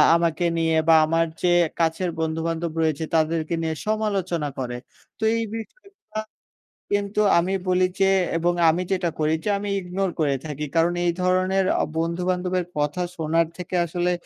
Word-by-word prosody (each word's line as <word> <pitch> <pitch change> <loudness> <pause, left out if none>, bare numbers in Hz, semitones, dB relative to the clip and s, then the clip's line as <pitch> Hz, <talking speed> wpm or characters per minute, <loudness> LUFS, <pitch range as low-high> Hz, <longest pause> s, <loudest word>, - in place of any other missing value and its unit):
আমাকে 170 0 +1
নিয়ে 165 -1 +2
বা 160 - +8
আমার 165 +1 +2 0.2
যে 175 -1 +3 0.3
কাছের 165 +2 +1
বন্ধু-বান্ধব 165 +1 -2
রয়েছে 160 -1 0
তাদেরকে 160 +1 +1
নিয়ে 160 -1 -1
সমালোচনা 195 -8 -1
করে। 125 -1 -3 0.4
তো - - -5
এই 230 - 0
বিষয়গুলা 395 - -9 0.7
কিন্তু 205 +1 0 0.2
আমি 180 +3 0 0.2
বলি 185 0 +3
যে 195 0 +5 0.3
এবং 175 +1 +2 0.2
আমি 175 +3 0
যেটা 175 -3 +1
করি 155 +1 +2
যে - - -1
আমি 205 0 -4
ইগনোর 185 +1 -2
করে 140 -3 +2
থাকি। 150 0 -4
কারণ 165 +1 +3
এই 170 - +2
ধরনের 185 +1 +2 0.2
অ - - +2
বন্ধু-বান্ধবের 180 +1 -1
কথা 150 +5 0
শোনার 165 +1 +1
থেকে 180 +1 -6
আসলে 175 +1 0
170 Hz, 155 wpm, -24 LUFS, 160-185 Hz, 0.7 s, বা